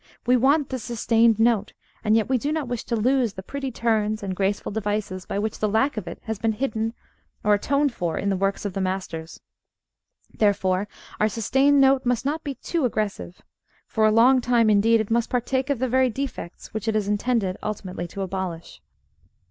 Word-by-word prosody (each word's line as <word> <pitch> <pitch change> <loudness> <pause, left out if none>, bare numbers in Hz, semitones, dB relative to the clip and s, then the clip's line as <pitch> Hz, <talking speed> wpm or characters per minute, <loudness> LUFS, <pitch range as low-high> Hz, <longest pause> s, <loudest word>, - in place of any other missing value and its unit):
We 250 +1 +4
want 275 +4 +3
the 260 - -3
sustained 230 -1 +2
note, 225 -3 +2 0.3
and 215 +1 +3
yet 225 -2 +2
we 260 -1 +1
do 290 +5 -2
not 310 -4 -2
wish 245 -2 -3
to 235 - -1
lose 240 0 +2
the 190 - -8
pretty 275 +5 -4
turns 215 -2 0
and 190 -2 -3
graceful 195 +2 -1
devices 205 -3 -3
by - - -3
which 215 +1 -2
the 215 - +1
lack 245 +7 +1
of 215 - -5
it - - -6
has 220 -3 -4
been 225 0 +1
hidden, 225 -1 -2 0.5
or 210 - +4
atoned 280 +6 +1
for, 175 -6 -2
in 200 - -1
the 195 - +1
works 195 +2 -1
of 200 - -3
the 195 - -2
masters. 185 -4 -4 0.9
Therefore 195 -2 +1 0.3
our 215 - +3
sustained 270 +7 +3
note 270 -1 +4
must 245 -1 0
not 310 +3 -1
be 280 -2 -4
too 335 +2 -2
aggressive. 210 -6 -3 0.4
For 220 -1 +2
a - - +4
long 250 +4 +5
time, 235 -3 +3
indeed, 220 +2 +4
it 220 - -6
must 235 0 +1
partake 260 +2 -1
of 280 - +1
the 260 +2 0
very 260 +1 +3
defects 265 -8 -6
which 220 0 -4
it 220 - +1
is 210 -2 0
intended 205 -2 0
ultimately 190 -4 -4
to 195 +3 -5
abolish. 185 -3 -5
220 Hz, 200 wpm, -24 LUFS, 200-255 Hz, 0.9 s, long